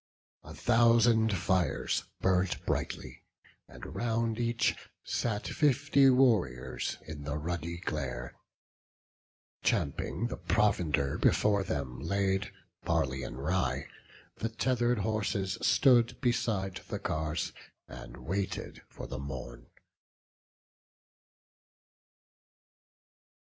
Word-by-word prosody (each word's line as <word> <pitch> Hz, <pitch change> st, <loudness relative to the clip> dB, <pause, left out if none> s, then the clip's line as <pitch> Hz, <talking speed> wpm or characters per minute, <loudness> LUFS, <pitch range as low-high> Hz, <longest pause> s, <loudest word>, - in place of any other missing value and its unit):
A -, -, -10 dB
thousand 115 Hz, -2 st, +4 dB
fires 90 Hz, +1 st, 0 dB, 0.2 s
burnt 95 Hz, 0 st, +1 dB
brightly; -, -, -3 dB, 0.5 s
and -, -, -10 dB
round 115 Hz, -1 st, 0 dB
each 120 Hz, 0 st, +1 dB, 0.3 s
Sat 105 Hz, -3 st, -2 dB
fifty 140 Hz, -1 st, +4 dB
warriors 90 Hz, -, +2 dB
in 75 Hz, -2 st, -7 dB
the 75 Hz, +1 st, -3 dB
ruddy 85 Hz, +2 st, -3 dB
glare; 65 Hz, -8 st, -4 dB, 1.3 s
Champing 80 Hz, -, 0 dB
the 120 Hz, -, -3 dB
provender 80 Hz, -10 st, +1 dB
before 100 Hz, -2 st, +3 dB
them 70 Hz, -7 st, -3 dB
laid, 95 Hz, +5 st, 0 dB, 0.3 s
Barley 65 Hz, 0 st, 0 dB
and 65 Hz, -1 st, -6 dB
rye, 90 Hz, +2 st, 0 dB, 0.5 s
the 115 Hz, -, -2 dB
tether'd 120 Hz, +1 st, +1 dB
horses 100 Hz, -2 st, -1 dB
stood 120 Hz, -4 st, +4 dB
Beside 110 Hz, -7 st, 0 dB
the -, -, -3 dB
cars, 80 Hz, +1 st, -2 dB, 0.3 s
and -, -, -10 dB
waited 95 Hz, +2 st, -3 dB
for -, -, -8 dB
the 70 Hz, -, -6 dB
morn. 65 Hz, -3 st, -7 dB
95 Hz, 90 wpm, -31 LUFS, 75-115 Hz, 1.3 s, thousand